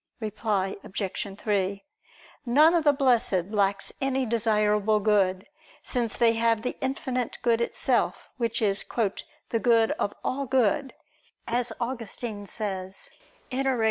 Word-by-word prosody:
Reply 210 -3 -1
Obj. 195 +1 -4
3: 200 0 -1 0.6
None 300 +7 +6
of 340 -2 +2
the 290 - +7
Blessed 235 -9 +2
lacks 200 -2 +1
any 265 -1 +1
desirable 215 -2 +2
good; 195 -3 +2 0.4
since 240 -4 -2
they 230 -1 +5
have 230 -1 +2
the 250 - -2
Infinite 260 -2 -2
Good 235 -1 +3
Itself, 235 - 0
Which 230 -2 -1
is 200 -1 +1 0.7
"the 230 - 0
good 230 -1 +4
of 205 - -1
all 275 +1 -2
good," 260 +2 +1 0.5
as 240 +1 -1
Augustine 230 -3 -4
says 190 -3 -5 0.4
(Enarr. 265 -1 +1
225 Hz, 125 wpm, -27 LUFS, 205-250 Hz, 0.7 s, the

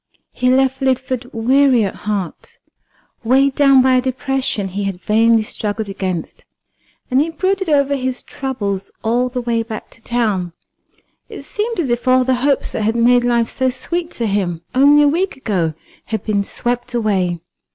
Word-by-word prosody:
He 250 0 0
left 265 +1 +2
Lidford 260 -1 -1
weary 255 0 +3
at 195 - -3
heart, 200 -5 -5 0.7
weighed 265 +4 +3
down 275 -2 +5
by 260 0 +4
a 255 - +4
depression 260 -5 -2
he 200 +2 -3
had 195 -2 -3
vainly 225 +3 +3
struggled 215 0 -3
against, 185 -4 -4 0.7
and 260 +2 +4
he 315 - 0
brooded 375 +2 -1
over 280 -1 +2
his 255 -1 -3
troubles 205 -8 -4
all 240 +3 +1
the 250 0 -3
way 235 -1 0
back 225 -1 -7
to - - -15
town. 210 -8 -1 0.8
It - - -9
seemed 450 0 -3
as 280 -8 0
if 240 +2 -2
all 255 0 +5
the 260 +1 +1
hopes 280 0 +1
that - - -3
had 220 +2 0
made 245 +1 +4
life 235 -1 +1
so 260 0 +1
sweet 335 +7 -3
to 235 - -2
him 185 -5 -1
only 285 +3 +6
a - - +5
week 350 +3 0
ago 180 - -1 0.3
had 220 -1 -3
been 205 -2 0
swept 245 +4 -3
away. 190 -6 0
245 Hz, 170 wpm, -18 LUFS, 215-265 Hz, 0.8 s, only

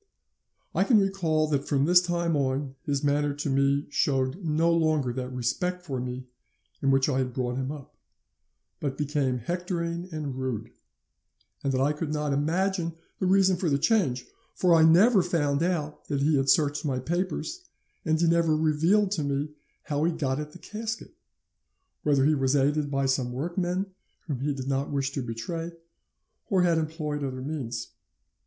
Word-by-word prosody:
"'I - - +3
can 235 -5 +5
recall 170 -6 +1
that 140 -2 0
from 140 -1 +2
this 175 +2 +6
time 170 -2 0
on, 135 0 -1
his 140 -1 0
manner 145 0 +1
to 145 0 -3
me 140 +1 +2
showed 135 +6 0
no 165 +1 +2
longer 155 -6 +1
that 125 0 -4
respect 180 +9 -2
for 135 -6 -3
me 125 +1 -5 0.6
in 135 - +2
which 135 0 +4
I 135 -3 +1
had 125 -2 -2
brought 125 -1 -1
him 130 +1 -2
up, 145 -3 -10 0.8
but 135 -2 -3
became 145 -3 0
hectoring 170 - -3
and 150 -4 -4
rude, 130 -5 -3 0.9
and 140 - +1
that 130 - 0
I 145 +3 +2
could 150 0 -4
not 150 -1 -1
imagine 170 +3 0 0.2
the 185 - +1
reason 190 -1 +3
of 170 - +2
the 140 - +3
change, 140 - +1 0.3
for 180 -2 +3
I 165 - +6
never 185 +7 +6
found 150 -5 0
out 165 -4 -2
that 140 -2 -1
he 150 +2 +3
had 135 0 +1
searched 145 -3 +3
my 135 -4 -1
papers, 180 - -3 0.3
and 160 -1 +1
he 170 - +3
never 165 -2 +3
revealed 165 +6 +2
to 170 -7 0
me 140 +1 -1 0.3
how 145 0 -1
he 170 - +3
got 145 -4 -1
at 150 0 -5
the 180 - -12
casket, 220 +4 -6 0.9
whether 140 -2 +3
he 155 - +4
was 135 -1 +1
aided 145 +1 +2
by 135 -1 0
some 130 -2 0
workmen 175 +6 -1 0.4
whom 145 -6 -3
he 145 +3 0
did 130 -1 -5
not 135 0 -1
wish 140 -1 -1
to 140 - -3
betray, 145 +9 -5 0.8
or 190 -4 +3
had 170 -2 +3
employed 155 -2 -3
other 130 -1 -4
means. 135 -5 -4
150 Hz, 175 wpm, -27 LUFS, 135-170 Hz, 0.9 s, this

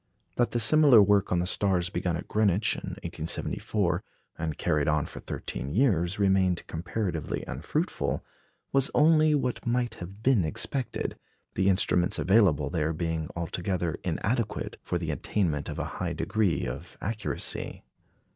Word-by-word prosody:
That 120 - +2
the 120 - -1
similar 140 +1 +7
work 100 -1 +4
on 90 - +2
the 85 - +1
stars 95 -2 +2
begun 90 -3 -1
at 85 - -8
Greenwich 105 0 +2
in - - -7 0.2
1874, 80 +1 -2 0.3
and 80 -2 -4
carried 75 -1 +1
on 75 -1 +2
for - - -9
thirteen 65 - -5
years, 95 - +2
remained 95 -3 +2
comparatively 85 -1 -3
unfruitful, - - -2 0.5
was 135 0 +4
only 155 0 +5
what 125 -4 -1
might 120 -1 0
have 95 +5 -9
been 125 -7 +4
expected, 120 - -3 0.3
the 95 +1 +2
instruments 90 -2 +2
available 90 -8 +3
there 80 -2 0
being 80 -1 -2
altogether 85 0 -2
inadequate 105 +6 -2
for 90 - -2
the 80 -2 -3
attainment 75 0 -1
of - - -5
a - - -2 0.2
high - - -1
degree 105 - 0
of 70 +8 -7
accuracy. 110 +1 -4
95 Hz, 145 wpm, -28 LUFS, 80-110 Hz, 0.5 s, similar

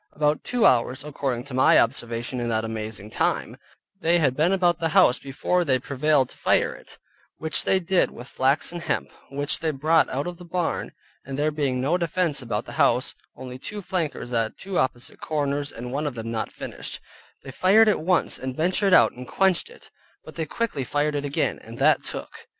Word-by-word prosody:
About 150 0 +1
two 245 -3 +1
hours 125 +3 +3
(according 135 -5 -3
to 140 0 -11
my 130 - +5
observation, 120 +2 0
in 120 - -2
that 110 -1 0
amazing 110 -2 -6
time) - - -1 0.4
they 170 -1 +3
had 135 -6 +2
been 160 +5 +2
about 175 -3 +2
the 165 - 0
house 180 -10 +6
before 140 +6 0
they 135 -5 +2
prevailed 140 +1 +1
to - - -15
fire - - +2
it - - -14 0.4
(which 160 0 -2
they 190 - +3
did 185 +1 +2
with 120 +2 -11
flax 135 +5 +1
and 175 -1 -6
hemp, 160 -3 -2 0.2
which 145 +2 -2
they 165 - 0
brought 155 +3 +2
out 140 +2 -2
of 175 -1 -5
the 180 - -11
barn, 175 0 -2 0.3
and 135 +1 -6
there 150 +1 +1
being 140 -4 -1
no 155 +8 +1
defense 170 -3 0
about 120 -2 -3
the - - -9
house, - - +3 0.2
only 130 0 -8
two 205 +9 -6
flankers 160 -9 -3
at 115 -2 0
two 195 -2 -3
opposite 125 -1 -2
corners 145 -1 -1
and 125 +1 -7
one 145 +3 -1
of 140 - -4
them 115 0 -5
not 110 -1 -3
finished); - - -7 0.4
they 135 - -8
fired 200 - +5
it 215 - +3
once 180 +3 +1
and 130 0 -4
one - - -17
ventured 185 +3 +3
out - - +6
and 125 0 -10
quenched 190 - +2
it, 480 - -16 0.3
but - - -10
they 160 -2 -3
quickly 225 - -2
fired 145 +4 0
it 145 0 -2
again, 140 - -1
and - - -11
that - - +4
took. - - -7
145 Hz, 205 wpm, -24 LUFS, 130-170 Hz, 0.4 s, house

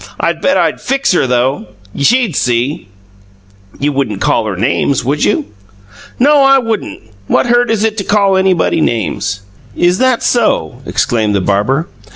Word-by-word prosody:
"I - - +1
bet - - 0
I'd - - 0
FIX 275 +1 0
her 175 -7 +1
though, 125 +1 +2
all 110 - -11 0.3
right. 140 - -4
She'd 240 - +2
see!" 125 -1 -1 0.9
"You 145 +1 0
wouldn't 130 -8 -2
call 110 - +1
her 100 - -3
names, 125 +3 0
would 145 +3 -1
you?" 105 - +1 0.7
"No, 285 +3 +4
I 270 0 +5
wouldn't! 225 - -3 0.2
What - - +2
hurt 240 0 +2
is 220 -2 0
it 220 -1 -1
to - - -2
call 200 -1 +2
anybody 190 -4 +1
names?" 105 -4 -2 0.3
"Is 175 +1 +1
that 255 -2 +1
SO!" 220 - 0
exclaimed 110 -3 0
the - - +2
barber. 105 - 0
150 Hz, 170 wpm, -13 LUFS, -, 0.9 s, I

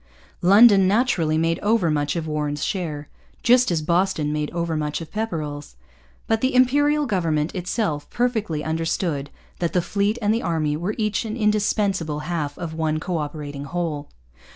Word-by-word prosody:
London 200 +1 +7
naturally 190 -8 +2
made 165 +1 +1
overmuch 165 -9 +1
of 165 -2 -2
Warren's 150 -1 -2
share, 155 -7 -3 0.4
just 250 +1 +5
as 165 -3 0
Boston 170 -3 +1
made 150 0 -2
overmuch 160 -3 -2
of 160 -2 -9
Pepperrell's. 155 -10 -4 0.5
But 225 0 0
the 260 0 +1
Imperial 290 +4 +3
government 165 - 0
itself 180 -4 -2
perfectly 220 -11 -1
understood 160 -2 -2 0.3
that 170 -2 -1
the 180 - +3
fleet 205 +4 0
and 210 -1 +2
the 230 - 0
army 155 -3 0
were 175 +7 -3
each 215 -2 0
an 220 +1 -4
indispensable 205 -7 0
half 155 -4 -3
of 165 -2 -5
one 160 -1 -1
co 175 +2 -2
operating 145 -2 -5
whole. 160 -2 -3
170 Hz, 155 wpm, -23 LUFS, 150-210 Hz, 0.5 s, London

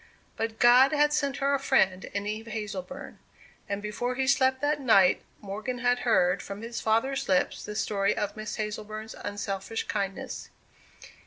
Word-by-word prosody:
But 225 0 -3
God 250 +4 +6
had 295 0 +3
sent 280 -2 0
her 280 0 +1
a 280 - +2
friend 190 -9 +2
in 200 0 -4
Eve 215 +2 -4
Hazleburn. 215 +4 -6 0.5
And 200 +1 -3
before 245 +4 -2
he 265 +1 0
slept 260 -1 +3
that 295 0 +1
night, 195 -8 +5 0.2
Morgan 215 +5 -4
had 245 0 +2
heard 185 -7 +2
from 200 +2 -7
his 230 0 -5
father's 230 +5 0
lips 185 -1 +1
the 210 - -6
story 205 -1 0
of 210 -2 -2
Miss 215 0 -5
Hazleburn's 215 0 -5
unselfish 205 +1 -4
kindness. 195 -1 -4
220 Hz, 160 wpm, -28 LUFS, 205-260 Hz, 0.5 s, God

